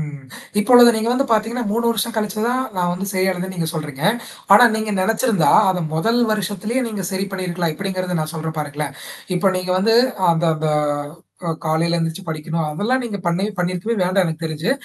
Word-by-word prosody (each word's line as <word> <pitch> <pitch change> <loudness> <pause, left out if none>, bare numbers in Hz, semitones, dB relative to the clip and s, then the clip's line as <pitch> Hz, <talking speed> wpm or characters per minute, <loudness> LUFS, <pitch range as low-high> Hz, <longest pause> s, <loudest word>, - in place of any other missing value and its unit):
ம். 150 -2 -7 0.4
இப்பொழுது 245 +2 +7
நீங்க 220 +1 -1
வந்து 275 +2 +1
பார்த்தீங்கன்னா, 225 +3 0
3 235 +2 0
வருஷம் 230 0 -1
கழிச்சு 215 -1 -2
தான், 255 +1 0
நான் 175 -1 +1
வந்து 190 +2 -4
சரிய 190 0 +1
அடைதுன்னு 185 +1 -5
நீங்க 165 -2 -1
சொல்றீங்க. 150 -3 -5 0.5
ஆனா 225 +4 +8
நீங்க 220 -1 -2
நெனச்சிருந்தா, 220 -2 +2 0.2
அத 180 -1 -1
முதல் 230 +8 +2
வருஷத்திலே 210 +4 -2
நீங்க 205 -4 -5
சரி 190 +1 -1
பண்ணியிருக்கலாம். 175 -4 -2
எப்படிங்கிறத 185 -1 -3
நான் 155 0 -4
சொல்றேன் 160 0 -4
பாருங்களேன். 145 -1 -5 0.4
இப்ப 190 +2 +2
நீங்க 185 0 -2
வந்து 225 +4 +3 0.4
அந்த 165 +1 0
அந்த 155 0 -1 0.8
ஓ - - -1 0.2
காலையில 165 +2 +1
எழுந்திரிச்சு 165 +2 -2
படிக்கணும். 160 0 -3
அதெல்லாம் 220 +12 0
நீங்க 215 -4 -4
பண்ண 170 +1 0 0.2
பண்ணியிருக்கவே 180 +5 -1
வேண்டாம் 185 +2 +2
எனக்கு 160 0 -5
தெரிஞ்சு. 160 +6 -2
185 Hz, 180 wpm, -20 LUFS, 165-215 Hz, 0.8 s, ஆனா